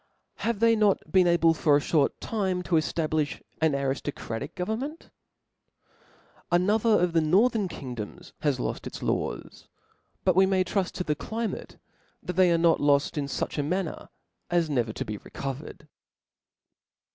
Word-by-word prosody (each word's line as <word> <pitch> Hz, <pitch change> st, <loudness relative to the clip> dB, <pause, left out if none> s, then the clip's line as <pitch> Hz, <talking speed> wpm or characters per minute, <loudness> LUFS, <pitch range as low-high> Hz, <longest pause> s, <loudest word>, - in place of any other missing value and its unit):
Have 230 Hz, -2 st, -2 dB
they 230 Hz, 0 st, +5 dB
not 210 Hz, -3 st, +1 dB
been 185 Hz, -2 st, +5 dB
able 170 Hz, -1 st, +4 dB
for 155 Hz, -2 st, +3 dB
a -, -, +5 dB
(hort 145 Hz, -1 st, +1 dB
time 190 Hz, -5 st, -1 dB
to 180 Hz, -, -5 dB
eftablifh 155 Hz, -1 st, 0 dB, 0.2 s
an 160 Hz, -2 st, +3 dB
ariftocratical 140 Hz, -1 st, -3 dB
government? 235 Hz, -, -4 dB, 1.4 s
Another 205 Hz, +6 st, +3 dB
of 175 Hz, -1 st, +1 dB
the 165 Hz, -, +4 dB
northern 200 Hz, +6 st, +3 dB
kingdoms 125 Hz, -, -8 dB
has 145 Hz, -4 st, 0 dB
loft -, -, -3 dB
its -, -, -7 dB
laws; -, -, -3 dB, 0.6 s
but 185 Hz, -2 st, +3 dB
we 190 Hz, +1 st, +5 dB
may 190 Hz, -1 st, +2 dB
truft 185 Hz, 0 st, -2 dB
to 180 Hz, -, -2 dB
the 150 Hz, -, 0 dB
climate 220 Hz, +9 st, -5 dB, 0.5 s
that 180 Hz, -, -4 dB
they 180 Hz, 0 st, +4 dB
are 170 Hz, -, +4 dB
not 165 Hz, 0 st, +3 dB
loft 145 Hz, -1 st, +3 dB
in 145 Hz, -2 st, -1 dB
fuch 140 Hz, -, -3 dB
a -, -, +1 dB
manner 180 Hz, +3 st, -3 dB, 0.4 s
as 170 Hz, -3 st, +1 dB
never 120 Hz, -5 st, 0 dB
to -, -, -5 dB
be 105 Hz, -, -4 dB
recovered. 140 Hz, +6 st, -7 dB
170 Hz, 155 wpm, -27 LUFS, 145-190 Hz, 1.4 s, they